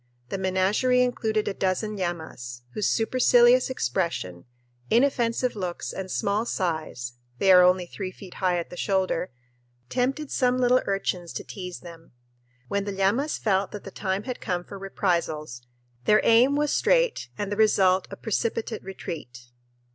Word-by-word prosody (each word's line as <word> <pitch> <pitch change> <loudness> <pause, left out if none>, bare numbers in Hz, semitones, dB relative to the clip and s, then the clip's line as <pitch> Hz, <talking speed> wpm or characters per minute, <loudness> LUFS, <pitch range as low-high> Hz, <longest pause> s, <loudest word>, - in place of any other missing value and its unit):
The 195 - -3
menagerie 195 +7 +2
included 220 -3 -1
a 205 - 0
dozen 195 +3 -1
llamas, 160 -10 -5
whose 210 - 0
supercilious 245 +2 +4
expression, 125 - -2 0.4
inoffensive 240 -1 +2
looks, 180 -4 -4
and 190 -1 -5
small 205 +2 0
size 160 - -3 0.2
they 195 +6 +4
are 180 -1 +9
only 180 0 +4
three 185 +1 -6
feet 185 -1 -12
high 180 -2 +2
at 170 - -4
the 180 - -8
shoulder 190 -2 0 0.6
tempted 270 +4 -1
some 250 -1 +2
little 255 0 +4
urchins 185 -3 -2
to - - -5
tease 180 -3 -7
them. 165 -4 -13 0.5
When 200 +7 -1
the 205 - -3
llamas 200 +10 +1
felt 195 -2 +1
that 210 - -7
the 195 - -9
time 190 0 -2
had 250 0 -5
come 175 -1 -2
for 200 +2 -10
reprisals, 170 -9 -2 0.4
their 215 0 +5
aim 245 +5 +5
was 295 0 +1
straight - - +2
and 205 -1 -3
the - - 0
result 190 -3 +3
a - - -7
precipitate 225 +1 -2
retreat. 125 -10 -8
195 Hz, 155 wpm, -26 LUFS, 180-230 Hz, 0.6 s, are